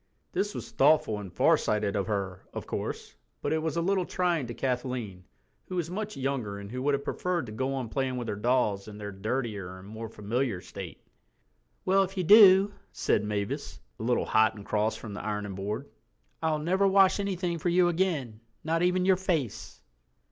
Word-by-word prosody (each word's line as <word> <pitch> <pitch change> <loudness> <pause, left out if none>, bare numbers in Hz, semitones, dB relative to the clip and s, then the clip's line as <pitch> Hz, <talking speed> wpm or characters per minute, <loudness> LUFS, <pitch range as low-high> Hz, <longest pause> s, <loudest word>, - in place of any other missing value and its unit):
This 205 +1 -1
was - - -6
thoughtful 135 -7 +3
and 95 -3 -8
farsighted 105 +2 +2
of 100 0 0
her, 95 -3 -2
of - - -4
course, - - -4 0.3
but 145 - 0
it 160 - +1
was 160 0 -2
a 170 - +1
little 190 +1 +2
trying 175 -7 0
to 120 - -5
Kathleen, 125 -7 -3 0.4
who 185 - -5
was 175 -1 -2
much 210 +2 -4
younger 130 -7 -2
and 100 0 -8
who 125 +1 -4
would 145 +1 +2
have 140 - -4
preferred 175 +1 -1
to 110 - -8
go 130 +5 -2
on 130 -3 -3
playing 130 +2 -1
with 120 -1 -4
her 105 - -2
dolls 105 -3 +1
in 105 -1 -9
their 105 -1 -6
dirtier 100 -2 -3
and 95 +1 -12
more 110 +1 -7
familiar 110 0 -2
state. 90 -2 -9 0.8
"Well, 195 +1 +4
if 195 0 -2
you 185 - +1
do," 200 +1 +8 0.2
said - - +1
Mavis, 105 -1 -3 0.2
a - - -5
little 120 +1 +1
hot 110 0 +3
and 100 -2 -10
cross 110 +1 0
from 110 -3 -8
the 100 - -6
ironing 105 -2 -3
board, 105 +8 -4 0.5
"I'll 160 -1 +1
never 185 +6 +2
wash 195 0 +5
anything 180 -4 -1
for 175 - 0
you 175 +1 +4
again, 160 - -1 0.2
not 165 +1 0
even 180 +1 +2
your 190 -1 +5
face." 165 - -2
130 Hz, 195 wpm, -28 LUFS, 105-175 Hz, 0.8 s, do